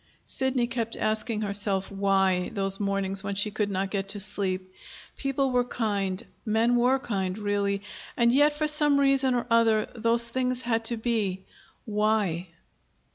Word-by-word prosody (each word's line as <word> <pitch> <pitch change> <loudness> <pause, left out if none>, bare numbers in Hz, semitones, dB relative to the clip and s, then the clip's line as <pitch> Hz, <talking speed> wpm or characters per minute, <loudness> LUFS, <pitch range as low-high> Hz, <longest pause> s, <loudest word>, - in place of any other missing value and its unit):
Sidney 265 -2 -1
kept 235 -2 -3
asking 215 0 -1
herself, 200 -2 -1
"Why?" 195 -2 +1
those 195 -1 0
mornings 195 -1 -1
when 200 0 -3
she 205 +2 +1
could 210 0 -1
not 195 0 -2
get 195 -1 -2
to 205 +1 -4
sleep. 190 -2 -1 0.4
People 275 -1 -1
were 250 0 +3
kind 205 -4 -2 0.2
men 225 +2 +2
were 250 +2 +3
kind, 195 -7 -3
really, 200 -1 -1 0.3
and 235 -1 +4
yet, 290 +3 +4
for 305 +1 -1
some 295 -1 +3
reason 275 -2 +3
or 240 - -1
other, 225 -2 +4
those 230 0 +2
things 255 +1 -1
had 230 -1 0
to 235 0 0
be. 215 -5 -1 0.4
Why? 210 -5 0
215 Hz, 155 wpm, -27 LUFS, 195-240 Hz, 0.4 s, and